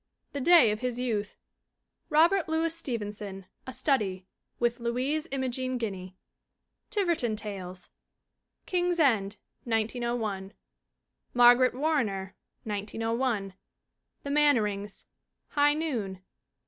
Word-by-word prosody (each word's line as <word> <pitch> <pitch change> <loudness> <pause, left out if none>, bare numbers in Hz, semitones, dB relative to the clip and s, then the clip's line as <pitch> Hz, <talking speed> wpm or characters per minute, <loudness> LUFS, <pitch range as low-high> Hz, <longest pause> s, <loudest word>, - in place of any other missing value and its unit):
The 285 - -3
Day 320 -7 +7
of 210 - -3
His 250 -1 -2
Youth. 220 -5 -2 0.7
Robert 330 +3 +4
Louis 325 +1 0
Stevenson 210 - -5 0.2
A - - -4
Study 195 -10 +1 0.3
(with 240 0 0
Louise 255 +7 -1
Imogen 255 -1 -2
Guiney). 190 -5 -5 0.7
Tiverton 340 - 0
Tales. 190 -4 -7 0.7
King's 355 -1 0
End, 215 -9 +2 0.3
1901. 225 -3 -1 0.8
Margaret 245 +1 +6
Warrener, 235 -11 -1 0.3
1901. 220 0 -2 0.7
The 280 - -4
Mannerings. 210 -9 +1 0.4
High 290 0 +3
Noon. 220 - -3
240 Hz, 95 wpm, -28 LUFS, 205-285 Hz, 0.8 s, Day